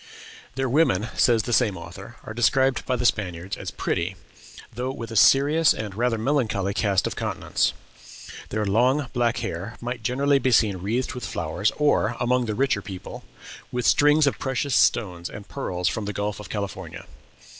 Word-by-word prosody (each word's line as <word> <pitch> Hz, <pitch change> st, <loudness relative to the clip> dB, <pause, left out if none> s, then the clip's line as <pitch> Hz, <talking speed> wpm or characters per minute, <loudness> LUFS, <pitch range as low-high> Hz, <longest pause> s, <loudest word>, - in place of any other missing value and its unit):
"Their 135 Hz, 0 st, -1 dB
women," 120 Hz, -, +2 dB
says 115 Hz, -3 st, +3 dB
the 120 Hz, -, -3 dB
same 110 Hz, -6 st, +2 dB
author, 90 Hz, +7 st, -10 dB
"are 110 Hz, -, -7 dB
described 130 Hz, +3 st, +2 dB
by 130 Hz, -, +1 dB
the 125 Hz, 0 st, -2 dB
Spaniards 95 Hz, -5 st, -1 dB
as -, -, -6 dB
pretty, 85 Hz, +3 st, -2 dB, 0.6 s
though 125 Hz, +3 st, -3 dB
with 115 Hz, -4 st, -7 dB
a -, -, -6 dB
serious 145 Hz, +7 st, +5 dB
and 105 Hz, -2 st, -5 dB
rather 115 Hz, +2 st, 0 dB
melancholy 110 Hz, -6 st, 0 dB
cast 100 Hz, -2 st, +1 dB
of -, -, -3 dB
countenance. -, -, -1 dB, 0.8 s
Their 110 Hz, 0 st, -1 dB
long, 125 Hz, +7 st, +2 dB
black 120 Hz, -1 st, +1 dB
hair 100 Hz, +4 st, -5 dB
might 120 Hz, 0 st, -5 dB
generally 135 Hz, +5 st, +2 dB
be 130 Hz, -, +1 dB
seen 105 Hz, -5 st, +3 dB
wreathed 110 Hz, +8 st, -2 dB
with 125 Hz, -, -7 dB
flowers, 85 Hz, +6 st, -1 dB
or, 120 Hz, -6 st, +2 dB
among 125 Hz, 0 st, +1 dB
the 105 Hz, -, -2 dB
richer 130 Hz, -5 st, +1 dB
people, 95 Hz, -2 st, -8 dB, 0.5 s
with 125 Hz, -1 st, -2 dB
strings 150 Hz, +1 st, +5 dB
of 140 Hz, -, 0 dB
precious 130 Hz, +1 st, -2 dB
stones 90 Hz, -9 st, +2 dB
and 105 Hz, -1 st, -10 dB
pearls 90 Hz, -10 st, -3 dB
from 110 Hz, +4 st, -1 dB
the 105 Hz, -, -4 dB
Gulf 105 Hz, +1 st, -3 dB
of 105 Hz, -, -9 dB
California. 100 Hz, -3 st, -5 dB
115 Hz, 175 wpm, -24 LUFS, 100-130 Hz, 0.8 s, serious